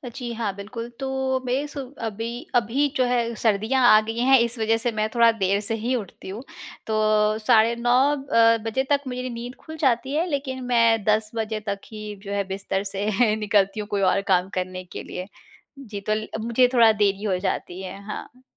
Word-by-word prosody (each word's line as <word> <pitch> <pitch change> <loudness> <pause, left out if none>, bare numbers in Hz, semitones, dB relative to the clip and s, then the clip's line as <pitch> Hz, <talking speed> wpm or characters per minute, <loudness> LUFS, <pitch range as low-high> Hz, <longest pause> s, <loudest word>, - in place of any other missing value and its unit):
जी 245 -2 -5
हाँ, 220 -3 -2
बिल्कुल, 225 +4 -7
तो 265 -1 -1
बेस 280 +4 -2
अभी, 235 -3 -5
अभी 245 +5 +2
जो 255 - +3
है 240 -1 0
सर्दियाँ 225 +4 +2
आ 215 - +8
गईं 225 +1 -3
हैं, 265 0 +7
इस 235 +1 0
वज़ह 225 +1 +2
से 235 +1 -1
मैं 215 -1 -1
थोड़ा 235 -1 +6
देर 200 -2 0
से 225 +2 -2
ही 230 +3 -2
उठती 200 -4 -7
हूँ। 210 +6 -6 0.4
तो 215 0 +2
साढ़े 225 +1 +4
9 240 +1 0 0.2
अ, 230 -5 +3
बजे 245 +4 0
तक 285 -1 +3
मेरी 250 0 -4
नींद 240 +1 -7
खुल 315 0 -10
जाती 265 -2 +1
है, 320 +3 +1
लेकिन 270 -3 -3
मैं 230 -3 +3
10 215 +1 +1
बजे 220 -1 -2
तक 200 0 -2
ही 215 -1 -7
जो 200 - -7
है 200 - 0
बिस्तर 195 0 -3
से 210 +2 +1
निकलती 205 -1 +1
हूँ, 210 - -4
कोई 205 -2 -1
और 195 +1 +3
काम 180 +1 +2
करने 185 0 -5
के 180 - -8
लिए। 180 +1 -7 0.5
जी, 210 -7 -7
तो 215 +1 -1
ल 215 0 -4
मुझे 235 +3 +3
थोड़ा 230 -2 +7
देरी 205 -1 +1
हो 190 -4 0
जाती 185 -1 -3
है। 190 +1 -7
हाँ। 245 +4 -8
225 Hz, 200 wpm, -24 LUFS, 205-245 Hz, 0.5 s, आ